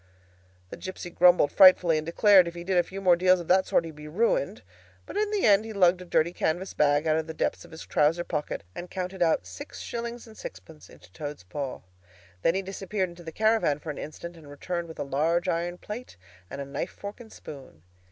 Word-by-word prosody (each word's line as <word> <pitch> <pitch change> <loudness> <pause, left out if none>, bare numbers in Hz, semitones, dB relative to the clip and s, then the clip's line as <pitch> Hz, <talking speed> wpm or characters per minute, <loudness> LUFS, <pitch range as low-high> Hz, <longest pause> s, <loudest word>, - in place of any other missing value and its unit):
The - - -7
gipsy 185 -1 -7
grumbled 175 -4 +5
frightfully, 180 -4 +7
and 155 - -6
declared 190 +1 +6
if 170 - -6
he 170 - -6
did 190 +1 -1
a - - +6
few 195 +3 -8
more 180 -2 +5
deals 185 +1 +4
of 170 - -7
that 185 +1 +4
sort 165 - +2
he'd 165 - -8
be 150 0 -10
ruined. 230 - 0 0.4
But - - -10
in 420 0 +1
the 415 -2 0
end 205 0 +5
he 220 0 -7
lugged 185 -2 +3
a - - -8
dirty 170 0 +1
canvas 180 +4 -1
bag 145 +1 +2
out 155 0 +2
of 160 0 -2
the 160 - -7
depths - - -1
of - - -15
his 160 - -10
trouser 160 +4 +2
pocket, 150 -4 -4
and 175 - -7
counted 185 0 -5
out 160 - +2
six 95 +1 -9
shillings 235 0 -5
and 220 -2 -14
sixpence 90 - -11
into 90 0 -17
Toad's 145 -1 -7
paw. 135 +9 -5 0.6
Then 165 - +2
he 195 - -1
disappeared 195 0 -3
into 175 0 -13
the 165 - -7
caravan 215 -7 +2
for 150 +1 -6
an 145 - -8
instant, 170 +3 -8
and 155 -3 -14
returned 170 +4 -4
with 160 - -10
a - - -2
large 160 +6 0
iron 175 0 -1
plate 215 - -8 0.3
and 140 - -7
a 140 - -4
knife, 140 +6 -4
fork, 205 +3 -9
and 225 -2 -13
spoon. 135 - -12
175 Hz, 230 wpm, -27 LUFS, 150-190 Hz, 0.6 s, frightfully